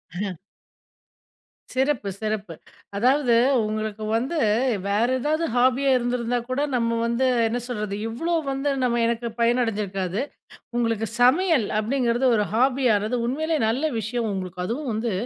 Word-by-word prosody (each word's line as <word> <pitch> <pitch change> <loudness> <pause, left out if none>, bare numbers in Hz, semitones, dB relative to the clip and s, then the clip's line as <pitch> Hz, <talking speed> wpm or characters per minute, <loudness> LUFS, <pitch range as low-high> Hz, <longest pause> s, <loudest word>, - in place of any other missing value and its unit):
அஹ. 195 +1 -2 1.4
சிறப்பு 260 -6 0
சிறப்பு. 210 -5 -3 0.4
அதாவது 255 +2 +3 0.3
உங்களுக்கு 215 0 -3
வந்து 270 +8 -2 0.5
வேற 210 +4 +2
ஏதாவது 310 +5 0
ஹாபியா 260 +2 +3
இருந்திருந்தா 245 0 -1
கூட 260 +3 0
நம்ம 230 -1 +1
வந்து, 235 +3 +1 0.2
என்ன 240 +2 -1
சொல்றது 210 -4 -3
இவ்வளோ 330 +10 -2 0.2
வந்து 270 +2 -1
நம்ம 240 -1 +1
எனக்கு 235 0 -1
பயன் 240 +2 +3
அடைஞ்சிருக்காது. 200 -3 -2 0.6
உங்களுக்கு 230 -2 0
"சமையல்" 280 - +4
அப்படிங்கிறது 240 +2 +1
ஒரு 210 - +2
ஹாபியானது 245 -3 +2
உண்மையிலே 315 +5 -1
நல்ல 280 +7 0
விஷயம். 225 +1 -2
உங்களுக்கு 185 -1 -5
அதுவும் 255 +3 -3
வந்து 225 0 -1
235 Hz, 125 wpm, -24 LUFS, 215-260 Hz, 1.4 s, சமையல்